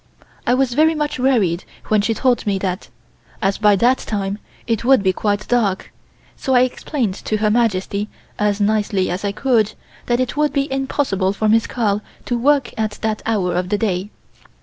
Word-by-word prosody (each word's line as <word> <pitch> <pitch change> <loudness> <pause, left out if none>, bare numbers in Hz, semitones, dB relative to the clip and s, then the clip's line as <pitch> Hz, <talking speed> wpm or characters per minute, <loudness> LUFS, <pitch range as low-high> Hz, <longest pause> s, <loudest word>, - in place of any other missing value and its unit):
I 245 - +4
was 260 -2 +1
very 315 +4 +3
much 295 -2 -2
worried 215 -10 +2 0.3
when 215 -1 +4
she 225 +2 0
told 250 -3 +1
me 200 -1 +1
that, 185 0 -3 0.5
as 195 +1 0
by 210 -1 +5
that 245 +6 +3
time 200 -1 -3 0.3
it 230 -2 -1
would 260 -4 +4
be 190 -1 +2
quite 205 +1 -1
dark, 210 -6 0 0.4
so 265 - 0
I 245 - +6
explained 255 -3 -1
to 215 +2 -3
Her 215 0 +1
Majesty 210 -2 0 0.3
as 210 0 +1
nicely 205 -3 +1
as 180 +3 -3
I 200 - 0
could 215 -1 +1 0.3
that 240 0 +1
it 255 +1 -1
would 300 -1 +1
be 280 0 0
impossible 265 -8 0
for 215 +2 -1
Miss 225 +1 +3
Carl 210 -4 0 0.2
to 245 - -1
work 275 +2 +2
at 215 -1 0
that 220 -1 -1
hour 195 -6 +1
of 180 +1 -1
the 205 - +1
day. 195 -2 -1
215 Hz, 190 wpm, -19 LUFS, 200-250 Hz, 0.5 s, I